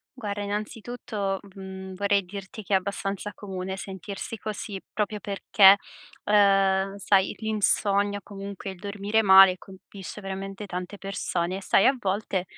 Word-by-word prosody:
Guarda, 205 Hz, -4 st, -4 dB
innanzitutto, 210 Hz, -1 st, -3 dB
mhmm, 190 Hz, -1 st, -9 dB
vorrei 200 Hz, 0 st, +1 dB
dirti 195 Hz, +3 st, -8 dB
che, 200 Hz, -, -1 dB
è -, -, +7 dB
abbastanza 200 Hz, +1 st, -3 dB
comune 190 Hz, -1 st, -5 dB
sentirsi 195 Hz, +3 st, -6 dB
così, 210 Hz, -2 st, -5 dB
proprio 210 Hz, 0 st, -2 dB
perché, 195 Hz, 0 st, +5 dB, 0.5 s
uhm, 195 Hz, -1 st, +3 dB
sai, 195 Hz, -1 st, +2 dB
l'insonnia, 205 Hz, -2 st, +1 dB
comunque, 200 Hz, -1 st, -7 dB
il 190 Hz, -, -9 dB
dormire 205 Hz, +2 st, 0 dB
male, 190 Hz, -2 st, +8 dB
colpisce 195 Hz, +1 st, -11 dB
veramente 195 Hz, +1 st, -6 dB
tante 180 Hz, +2 st, -6 dB
persone. 185 Hz, -2 st, -2 dB
E 195 Hz, -, -7 dB
sai 195 Hz, -, +4 dB
a 265 Hz, 0 st, +4 dB
volte, 195 Hz, -3 st, -1 dB
195 Hz, 135 wpm, -26 LUFS, 190-205 Hz, 0.5 s, male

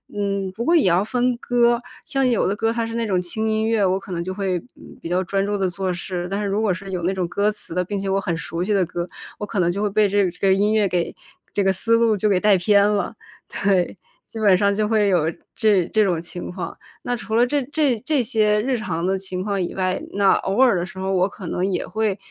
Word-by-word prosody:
嗯， 200 Hz, -2 st, -1 dB
不 225 Hz, -, -4 dB
过 335 Hz, -, +2 dB
也 290 Hz, -, +3 dB
要 180 Hz, +2 st, +3 dB
分 245 Hz, +2 st, 0 dB
歌， 240 Hz, -1 st, +2 dB, 0.2 s
像 270 Hz, -1 st, 0 dB
有 235 Hz, -6 st, +2 dB
的 200 Hz, -, 0 dB
歌 225 Hz, +2 st, 0 dB
它 230 Hz, -1 st, -1 dB
是 230 Hz, -, -5 dB
那 235 Hz, -, -1 dB
种 185 Hz, -2 st, +1 dB
轻 220 Hz, +5 st, -2 dB
音 220 Hz, 0 st, 0 dB
乐， 225 Hz, -3 st, +2 dB
我 190 Hz, +1 st, +1 dB
可 195 Hz, -1 st, -11 dB
能 170 Hz, 0 st, -2 dB
就 185 Hz, +1 st, -4 dB
会， 190 Hz, -2 st, -1 dB, 0.2 s
嗯， -, -, -14 dB
比 165 Hz, -, -6 dB
较 180 Hz, +1 st, +1 dB
专 195 Hz, +2 st, -1 dB
注 205 Hz, 0 st, -1 dB
地 190 Hz, -2 st, 0 dB
做 190 Hz, +1 st, -2 dB
事， 175 Hz, 0 st, -4 dB
但 200 Hz, +2 st, -2 dB
是 205 Hz, -, -1 dB
如 200 Hz, +2 st, 0 dB
果 205 Hz, -4 st, +2 dB
是 190 Hz, +2 st, -8 dB
有 180 Hz, -2 st, -2 dB
那 185 Hz, +3 st, +1 dB
种 185 Hz, -2 st, -1 dB
歌 205 Hz, +3 st, +1 dB
词 210 Hz, -5 st, -5 dB
的， 180 Hz, +1 st, 0 dB
并 205 Hz, +2 st, -3 dB
且 195 Hz, -, -4 dB
我 195 Hz, +1 st, +2 dB
很 170 Hz, -3 st, -2 dB
熟 165 Hz, +2 st, -4 dB
悉 205 Hz, +3 st, 0 dB
的 190 Hz, -3 st, +3 dB
歌， 175 Hz, +1 st, -4 dB, 0.3 s
我 210 Hz, -, -3 dB
可 200 Hz, -, -2 dB
能 175 Hz, 0 st, +2 dB
就 200 Hz, -, -3 dB
会 210 Hz, -, +1 dB
被 210 Hz, +1 st, +3 dB
这 200 Hz, 0 st, +3 dB
个 -, -, 0 dB
这 -, -, -21 dB
个 190 Hz, -, +5 dB
音 205 Hz, +3 st, +2 dB
乐 210 Hz, -2 st, +3 dB
给 175 Hz, -2 st, -1 dB, 0.4 s
这 205 Hz, -, +1 dB
个 195 Hz, -, +3 dB
思 230 Hz, +5 st, +2 dB
路 230 Hz, -1 st, +3 dB
就 210 Hz, +2 st, +1 dB
给 190 Hz, -3 st, +3 dB
带 210 Hz, -2 st, +5 dB
偏 200 Hz, +3 st, +4 dB
了。 210 Hz, +2 st, -1 dB, 0.5 s
对， 190 Hz, -2 st, +2 dB, 0.3 s
基 225 Hz, -, -10 dB
本 205 Hz, -3 st, +5 dB
上 200 Hz, 0 st, +2 dB
就 210 Hz, 0 st, +1 dB
会 215 Hz, -2 st, +2 dB
有 165 Hz, -4 st, +2 dB, 0.2 s
这 205 Hz, -6 st, +3 dB
这 215 Hz, -, +2 dB
种 175 Hz, -5 st, 0 dB
情 175 Hz, +1 st, -7 dB
况。 180 Hz, 0 st, -6 dB, 0.3 s
那 245 Hz, -, -1 dB
除 225 Hz, -2 st, -6 dB
了 240 Hz, +1 st, +5 dB
这 285 Hz, +1 st, 0 dB
这 285 Hz, -3 st, +1 dB
这 295 Hz, -3 st, +2 dB
些 215 Hz, -2 st, +2 dB
日 255 Hz, +1 st, 0 dB
常 170 Hz, -7 st, -3 dB
的 190 Hz, +1 st, +1 dB
情 185 Hz, -1 st, -5 dB
况 200 Hz, -2 st, -1 dB
以 175 Hz, -, -3 dB
外， 185 Hz, -1 st, -1 dB
那 200 Hz, -1 st, +4 dB
偶 200 Hz, +7 st, 0 dB
尔 245 Hz, -8 st, +5 dB
的 175 Hz, -, -1 dB
时 190 Hz, 0 st, -10 dB
候 190 Hz, 0 st, -2 dB
我 185 Hz, 0 st, +2 dB
可 190 Hz, -3 st, -9 dB
能 180 Hz, -, -1 dB
也 190 Hz, -2 st, -1 dB
会 215 Hz, -3 st, -1 dB
200 Hz, 295 characters per minute, -22 LUFS, 185-220 Hz, 0.5 s, 个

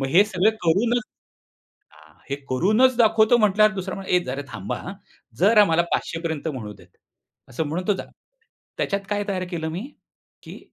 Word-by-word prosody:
मग 135 Hz, -, -1 dB
हे 180 Hz, +8 st, +5 dB
सगळं 210 Hz, 0 st, +2 dB
करूनच 230 Hz, +9 st, +2 dB, 0.9 s
हां, 75 Hz, 0 st, -20 dB, 0.2 s
हे 140 Hz, -, -1 dB
करूनच 215 Hz, -, +3 dB
दाखवतो 220 Hz, 0 st, +4 dB
म्हटल्यावर, 215 Hz, 0 st, +4 dB
दुसरा 190 Hz, 0 st, -4 dB
म्हणा, 195 Hz, -1 st, -8 dB
"ए, 180 Hz, -, +5 dB
जरा 135 Hz, +2 st, -4 dB
थांबा. 95 Hz, -, -4 dB
आ, 185 Hz, -, -7 dB, 0.5 s
जरा 210 Hz, +3 st, +6 dB
मला 165 Hz, 0 st, +2 dB
500 165 Hz, -, -2 dB
पर्यंत 160 Hz, -2 st, -3 dB
म्हणू 120 Hz, -8 st, -6 dB
दे." 90 Hz, -, -18 dB, 0.6 s
असं 140 Hz, +7 st, -3 dB
म्हणून 170 Hz, +5 st, -4 dB
तो 205 Hz, -, +4 dB
जा, -, -, -6 dB, 0.7 s
त्याच्यात 200 Hz, -1 st, -1 dB
काय 205 Hz, 0 st, -1 dB
तयार 185 Hz, -2 st, -2 dB
केलं 160 Hz, -3 st, -3 dB
मी, 175 Hz, +9 st, -5 dB, 0.6 s
की -, -, -10 dB
185 Hz, 175 wpm, -23 LUFS, 160-210 Hz, 0.9 s, जरा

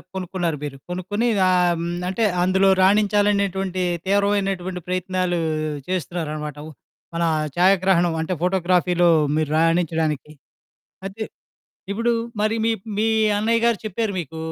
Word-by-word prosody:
కొనుక్కున్నారు 180 Hz, -4 st, -2 dB
మీరు. 140 Hz, -2 st, -5 dB
కొనుక్కొని 195 Hz, +6 st, -2 dB, 0.2 s
ఆహ్, 180 Hz, -1 st, +3 dB
హ్మ్. -, -, -3 dB, 0.2 s
అంటే 205 Hz, +5 st, -1 dB, 0.2 s
అందులో 190 Hz, +1 st, +3 dB
రాణించాలనేటువంటి 200 Hz, -2 st, +2 dB, 0.2 s
తీవ్రమైనటువంటి 195 Hz, -2 st, 0 dB
ప్రయత్నాలు 185 Hz, -1 st, -1 dB, 0.5 s
చేస్తున్నారన్నమాట. 155 Hz, -4 st, -4 dB, 0.6 s
మన 170 Hz, -, 0 dB, 0.3 s
ఛాయాగ్రహణం 180 Hz, -2 st, +3 dB
అంటే 160 Hz, +3 st, -2 dB
ఫోటోగ్రఫీలో 180 Hz, -1 st, +2 dB, 0.3 s
మీరు 155 Hz, -1 st, 0 dB
రాణించడానికి. 160 Hz, -3 st, 0 dB, 0.7 s
అయితే 195 Hz, +3 st, -7 dB, 0.7 s
ఇప్పుడు 230 Hz, +4 st, 0 dB, 0.3 s
మరి 215 Hz, +1 st, +1 dB
మీ 230 Hz, -, +2 dB, 0.3 s
మీ 215 Hz, +2 st, +1 dB, 0.3 s
అన్నయ్య 225 Hz, +2 st, +1 dB
గారు 235 Hz, -3 st, +2 dB
చెప్పారు 215 Hz, +1 st, -2 dB
మీకు 160 Hz, 0 st, -8 dB
185 Hz, 105 wpm, -22 LUFS, 175-200 Hz, 0.7 s, ఆహ్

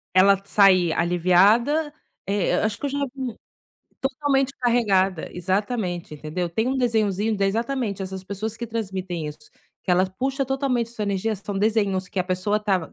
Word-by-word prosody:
eh, -, -, +7 dB
ela 195 Hz, +1 st, +5 dB
sair 190 Hz, -4 st, +4 dB
aliviada, 200 Hz, -, +3 dB, 0.3 s
eh, 200 Hz, -2 st, +1 dB
acho 215 Hz, -1 st, 0 dB
que -, -, -5 dB
eu -, -, -3 dB
já 285 Hz, +1 st, -2 dB, 0.2 s
vi 260 Hz, -2 st, -3 dB, 0.7 s
totalmente 270 Hz, 0 st, 0 dB
carregada, 195 Hz, -8 st, +2 dB
exatamente, 185 Hz, -2 st, -2 dB
entendeu? 155 Hz, +4 st, -3 dB
Tem 220 Hz, +9 st, -1 dB
um 270 Hz, -, 0 dB
desenhozinho 220 Hz, -3 st, +1 dB
exatamente, 225 Hz, 0 st, -1 dB
essas 190 Hz, 0 st, -5 dB
pessoas 205 Hz, +3 st, -4 dB
que 235 Hz, -, -5 dB
transmitem 190 Hz, -7 st, -4 dB
isso, 150 Hz, 0 st, -10 dB, 0.3 s
que 185 Hz, -, -3 dB
ela 185 Hz, +1 st, +4 dB
puxa 270 Hz, +8 st, -2 dB
totalmente 260 Hz, -4 st, 0 dB
sua 220 Hz, -3 st, -5 dB
energia, 200 Hz, +2 st, -1 dB
são 195 Hz, 0 st, -5 dB
desenhos 200 Hz, -3 st, +1 dB
que 185 Hz, -, -2 dB
a -, -, -1 dB
pessoa 185 Hz, +3 st, 0 dB
estava 195 Hz, -5 st, -1 dB
200 Hz, 165 wpm, -24 LUFS, 185-235 Hz, 0.7 s, eh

